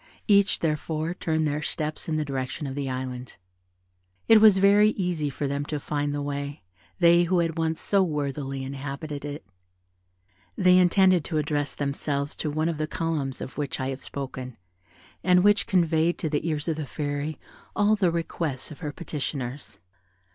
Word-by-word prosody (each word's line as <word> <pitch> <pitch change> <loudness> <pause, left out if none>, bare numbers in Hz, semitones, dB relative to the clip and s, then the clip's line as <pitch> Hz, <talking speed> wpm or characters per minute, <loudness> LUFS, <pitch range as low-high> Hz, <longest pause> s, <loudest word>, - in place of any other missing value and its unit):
Each, 200 -2 +4
therefore, 155 +1 -1
turned 160 -3 0
their 150 +1 -1
steps 155 0 -3
in 155 - 0
the 155 - -1
direction 135 +1 -4
of 135 - -4
the 140 -1 -3
Island. 130 -1 -5 0.9
It 225 -1 +7
was 215 -3 +8
very 200 +2 +6
easy 175 -6 -1
for 140 +1 -4
them 140 +1 -1
to 150 0 -3
find 145 0 -2
the 145 0 -2
way, 140 -2 -4 0.3
they 170 0 +5
who 180 +2 +1
had 165 -2 +1
once 160 -1 -1
so 200 -1 +2
worthily 140 -5 -2
inhabited 140 +2 -5
it. 145 +1 -6 1.1
They 185 -1 +6
intended 185 -1 +4
to 160 - -2
address 145 -1 -1
themselves 140 0 -2
to 155 - -2
one 155 +2 0
of 165 -3 -2
the 155 - -1
columns 155 -6 -2
of 135 - -7
which 145 -1 -3
I 130 0 -1
have 135 0 -6
spoken, 130 -3 -6 0.7
and 180 -1 +5
which 205 +1 +4
conveyed 170 -2 +2
to 160 - -3
the 150 +2 -1
ears 150 -1 -2
of 160 -2 0
the 155 -3 -4
Fairy 145 +1 -3 0.4
all 205 +1 +4
the 190 -4 +2
requests 165 -5 -2
of 150 - -10
her 150 -4 -4
petitioners. 145 -4 -5
150 Hz, 175 wpm, -26 LUFS, 140-170 Hz, 1.1 s, was